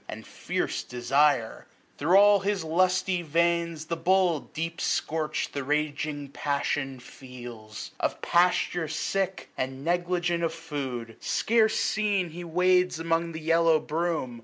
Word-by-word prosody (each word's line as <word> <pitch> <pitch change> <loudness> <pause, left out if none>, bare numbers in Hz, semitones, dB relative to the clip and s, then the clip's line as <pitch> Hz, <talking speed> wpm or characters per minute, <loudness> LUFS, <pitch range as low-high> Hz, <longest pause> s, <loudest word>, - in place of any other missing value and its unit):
And - - -7
fierce - - -3
desire. 125 0 +1 0.3
Thro' 175 +7 +5
all 205 0 +6
his 200 -2 -1
lusty 185 +2 +1
veins 170 0 0
The 170 - -2
bull, 180 -1 +2
deep 165 +1 -4
scorch'd, 155 -1 -1
the 140 - -3
raging 150 0 -2
passion 140 -2 -2
feels. 120 -4 -10
790 - - 0
Of - - -26
pasture 175 -1 +2
sick, 190 +4 -2
and 130 +2 -4
negligent 175 0 0
of 165 -1 -1
food. 135 -8 -5
Scarce 220 -1 +2
seen, 200 -5 0
he 175 +2 -7
wades 180 +1 +2
among 165 +1 -1
the 160 - -6
yellow 165 0 +3
broom. 155 -6 -2
165 Hz, 135 wpm, -27 LUFS, 145-180 Hz, 0.3 s, all